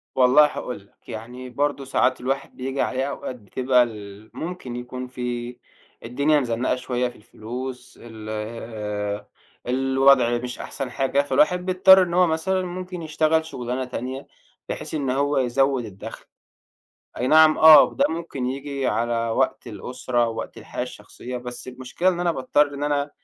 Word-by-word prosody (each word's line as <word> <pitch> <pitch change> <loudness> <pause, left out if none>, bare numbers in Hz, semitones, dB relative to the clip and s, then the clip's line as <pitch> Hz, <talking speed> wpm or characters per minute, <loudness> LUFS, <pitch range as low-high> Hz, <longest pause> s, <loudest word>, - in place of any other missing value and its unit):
والله 130 +3 +6
هاقول 125 -4 -4
لك، 100 0 -23
يعني 120 +3 -7
برضه 140 +2 -1
ساعات 130 -1 +1
الواحد 135 +2 -3
بييجي 135 +1 -3
عليه 130 0 0
أوقات 130 - -5
بتبقى 125 +3 +2
ال 105 -2 -9
ممكن 165 -8 -6
يكون 125 +1 -6
في 125 -1 -5 0.5
الدنيا 140 +6 +2
مزنَّقة 125 -1 0
شوية 125 -1 -1
في 120 - -16
الفلوس 125 +4 -8
ال 110 -2 -10
آآ، 105 -2 -4 0.4
الوضع 135 -1 +4
مش 125 +1 -6
أحسن 130 -2 -5
حاجة، 135 +2 +1
فالواحد 150 +6 +2
بيضطر 190 0 +7
إن 170 -1 -4
هو 180 0 +5
مثلًا 185 +4 0
ممكن 180 0 -6
يشتغل 160 0 +1
شُغلانة 125 -3 -4
تانية 130 +2 -6 0.4
بحيث - - -5
إن 140 -4 -1
هو 140 +3 +1
يزوّد 135 0 +1
الدَخْل. 100 -3 -9 0.9
أي 125 - 0
نعم 155 +2 +6
آه، 155 -1 +8
ده - - +2
ممكن 160 -6 -4
ييجي 135 +1 -3
على 115 +1 0
وقت 115 - 0
الأسرة، 125 -1 -2
وقت 115 - -6
الحياة - - -5
الشخصية، 125 +1 -8
بس 125 0 -7
المشكلة 130 +8 -2
إن 175 -2 0
أنا 175 -1 +1
باضطر 145 +1 +1
إن 140 +1 -3
أنا 145 0 0
130 Hz, 150 wpm, -23 LUFS, 120-145 Hz, 0.9 s, آه